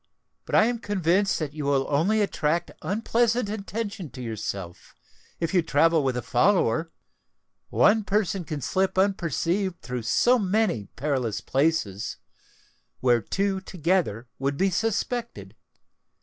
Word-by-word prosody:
But - - -2
I - - +6
am 240 0 -1
convinced 195 -1 +1
that 150 -3 -4
you 150 -2 -5
will 140 -1 +2
only 185 +10 +2
attract 170 -4 0
unpleasant 230 +2 +1
attention 205 -3 -4
to 125 - -9
yourself, 100 -6 -6 0.4
if 165 +1 -2
you 180 - +4
travel 160 0 +3
with 130 -2 0
a 125 - -3
follower: 160 - +2 0.8
one 215 +1 +4
person 195 -2 0
can 150 -2 -5
slip 190 +7 0
unperceived 190 -1 0
through 125 -1 -4
so 240 - +3
many 195 - 0
perilous 130 -6 -1
places, 135 - -1 0.8
where 120 -2 +3
two 195 - -1
together 170 - -1
would 140 +1 -1
be 195 +1 +2
suspected. 230 +4 -2
170 Hz, 130 wpm, -25 LUFS, 135-200 Hz, 0.8 s, I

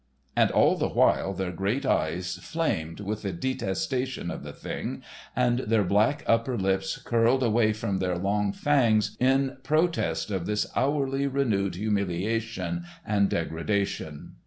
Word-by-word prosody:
And - - +4
all - - +4
the - - 0
while 95 - +3
their 95 -1 -3
great 100 +10 -1
eyes 90 -3 0
flamed 90 - -2
with 105 +1 -3
the 100 - -2
detestation 125 +1 -2
of - - -6
the - - -7
thing - - -5 0.3
and 125 0 +2
their 110 -3 +2
black 105 +8 +2
upper 115 +2 +2
lips 95 -1 0
curled 120 +3 +2
away 110 -1 +3
from 105 -3 -2
their 90 -2 0
long 100 +2 0
fangs 110 -6 +2
in 135 +1 +2
protest 155 -6 0
of 95 -3 -2
this 105 0 0
hourly 140 0 +1
renewed 110 -9 0
humiliation 110 - -1 0.2
and 100 -2 +2
degradation. 80 -2 -2
105 Hz, 140 wpm, -27 LUFS, 95-130 Hz, 0.3 s, And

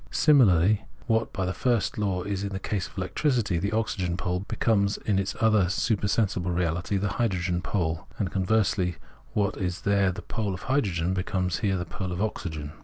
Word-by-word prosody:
Similarly, 105 - +4 0.2
what 115 -2 +1
by 95 - -2
the 90 - -1
first 120 +1 0
law 95 -3 0
is 100 -1 -2
in 100 - -2
the 95 -1 -4
case 95 -1 -2
of - - -19
electricity 100 - 0
the 100 +4 -1
oxygen 95 -6 -1
pole 90 0 -1
becomes 100 +1 +1
in 100 -3 0
its 95 - -2
other 110 -5 +4
supersensible 100 -3 0
reahty 85 +2 0
hydrogen 90 -6 0
pole; 85 -4 -2
and 95 -5 -1
conversely, 95 -2 +1 0.4
what 100 -1 0
is 90 -2 -2
there 100 -2 +2
the 105 +3 -7
pole 105 -4 -2
of 85 - -10
hydrogen, 95 -10 0
becomes 90 -1 -1
here 100 -3 +1
the 90 - -3
pole 95 -1 -5
of 90 - -3
oxygen. 80 -8 -3
95 Hz, 180 wpm, -27 LUFS, 90-105 Hz, 0.4 s, Similarly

